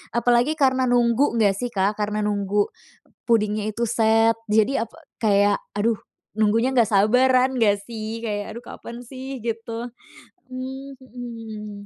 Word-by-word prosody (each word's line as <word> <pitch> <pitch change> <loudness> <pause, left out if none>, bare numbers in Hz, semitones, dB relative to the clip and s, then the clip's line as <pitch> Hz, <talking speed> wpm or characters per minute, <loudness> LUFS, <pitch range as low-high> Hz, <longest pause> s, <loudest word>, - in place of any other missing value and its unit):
Apalagi 245 +5 +3
karena 260 -2 +3
nunggu 240 +2 +3
nggak 205 -3 +4
sih, 245 +5 -3
Kak, 200 -2 +1
karena 210 0 -1
nunggu 205 0 0 0.6
pudingnya 215 -2 +1
itu 220 +2 -3
set, 225 0 +4
jadi 220 +4 +2
apa, - - -20 0.3
kayak 205 -1 +3 0.2
aduh 220 +1 +1 0.4
nunggunya 225 +4 +2
nggak 235 -3 +4
sabaran 250 +5 +4
nggak 205 -3 +3
sih, 225 0 -5
kayak, 205 0 -4
"Aduh 235 - -8
kapan 235 +1 -9
sih?" 265 +1 -7
Gitu. 230 +1 -4 0.6
Mmm, 265 +2 -7
mhm. 225 -5 -8
230 Hz, 135 wpm, -23 LUFS, 210-245 Hz, 0.6 s, nggak